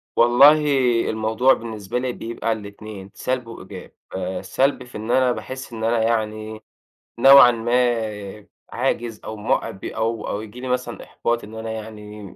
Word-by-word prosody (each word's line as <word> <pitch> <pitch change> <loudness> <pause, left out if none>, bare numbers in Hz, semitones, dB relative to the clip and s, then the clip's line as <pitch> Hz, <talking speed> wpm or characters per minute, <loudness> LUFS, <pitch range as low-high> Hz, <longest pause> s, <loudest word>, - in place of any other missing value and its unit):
والله 140 +6 +6 0.5
الموضوع 110 +4 +2
بالنسبة 110 -1 -4
لي 125 0 -2
بيبقى 115 0 -4
الاتنين، 100 -2 -7
سلْب 125 -2 -3
وإيجاب 95 -4 -10 0.2
آآ، 95 0 -3
سلْب 130 +8 0
في 125 -2 -10
إن 110 +2 -4
أنا 130 -1 +3
باحس 130 0 -7
إن 110 - -6
أنا 115 0 +2
يعني 110 -1 -2 0.6
نوعًا 135 -1 +9
ما 115 -4 -1 0.2
عاجز 120 -3 -2
أو 110 - -5
م 105 - -4 0.3
أو 110 +1 -2
أو 100 - -3
ييجي 110 +3 -10
لي 130 - -6
مثلًا 125 -1 -3
إحباط 120 -1 -2
إن 110 +2 -10
أنا 110 0 -5
يعني 105 -2 -9
115 Hz, 150 wpm, -22 LUFS, 105-120 Hz, 0.6 s, نوعًا